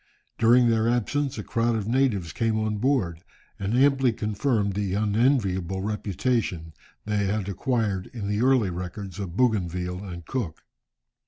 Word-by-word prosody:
During 120 Hz, +2 st, +5 dB
their 115 Hz, 0 st, +2 dB
absence 135 Hz, +4 st, 0 dB
a -, -, -4 dB
crowd 115 Hz, 0 st, 0 dB
of 105 Hz, -2 st, -2 dB
natives 115 Hz, -9 st, +1 dB
came 115 Hz, -2 st, 0 dB
on 110 Hz, -1 st, -1 dB
board, 105 Hz, -10 st, 0 dB, 0.4 s
and 100 Hz, +3 st, -1 dB
amply 135 Hz, -2 st, +4 dB
confirmed 105 Hz, -1 st, 0 dB
the 100 Hz, -1 st, -1 dB
unenviable 100 Hz, -4 st, +1 dB
reputation 105 Hz, -5 st, -1 dB, 0.3 s
they 105 Hz, -1 st, 0 dB
had 100 Hz, -1 st, -1 dB
acquired 100 Hz, -2 st, -1 dB
in 110 Hz, -5 st, -6 dB
the 105 Hz, +2 st, 0 dB
earlier 125 Hz, -7 st, +3 dB
records 90 Hz, +2 st, -6 dB
of 95 Hz, -2 st, -5 dB
Bougainville 90 Hz, -6 st, 0 dB
and 85 Hz, -4 st, -8 dB
Cook. 105 Hz, -12 st, -4 dB
105 Hz, 145 wpm, -26 LUFS, 95-120 Hz, 0.4 s, During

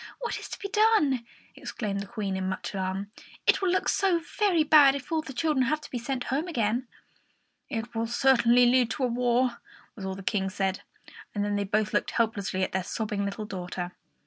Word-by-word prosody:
What 475 Hz, -, -3 dB
is -, -, -9 dB
to -, -, -6 dB
be 395 Hz, -, -5 dB
done?" 400 Hz, -, +3 dB, 0.3 s
exclaimed 200 Hz, -4 st, -4 dB
the 200 Hz, -, -5 dB
Queen, 200 Hz, -2 st, -3 dB
in 190 Hz, 0 st, -2 dB
much 185 Hz, 0 st, -4 dB
alarm. 195 Hz, +1 st, -3 dB, 0.3 s
"It -, -, +4 dB
will 380 Hz, -, +2 dB
look 370 Hz, -, +1 dB
so 375 Hz, -4 st, +2 dB, 0.2 s
very 375 Hz, -7 st, +4 dB
bad 290 Hz, -3 st, +7 dB
if 280 Hz, +4 st, -7 dB
all 320 Hz, -1 st, +1 dB
the 290 Hz, -, -9 dB
children 270 Hz, -1 st, +1 dB
have 305 Hz, +2 st, +1 dB
to -, -, -11 dB
be 245 Hz, -, -2 dB
sent 250 Hz, +1 st, -3 dB
home 305 Hz, +6 st, 0 dB
again!" 240 Hz, -5 st, 0 dB, 0.8 s
"It 235 Hz, -2 st, -4 dB
will 225 Hz, 0 st, -1 dB
certainly 245 Hz, -1 st, +4 dB
lead 245 Hz, -1 st, +4 dB
to 275 Hz, -, -3 dB
a -, -, +3 dB
war," 245 Hz, 0 st, +1 dB, 0.3 s
was 200 Hz, -, -9 dB
all 190 Hz, 0 st, -3 dB
the 195 Hz, -, -9 dB
King 190 Hz, -1 st, 0 dB
said; 190 Hz, -1 st, -2 dB, 0.5 s
and 205 Hz, 0 st, 0 dB
then 205 Hz, 0 st, -1 dB
they 205 Hz, 0 st, 0 dB
both 210 Hz, +2 st, 0 dB
looked -, -, +1 dB
helplessly 200 Hz, -5 st, 0 dB
at -, -, -1 dB
their 190 Hz, -, 0 dB
sobbing 205 Hz, 0 st, -2 dB
little 200 Hz, +2 st, -4 dB
daughter. 180 Hz, -2 st, -5 dB
235 Hz, 210 wpm, -27 LUFS, 200-275 Hz, 0.8 s, bad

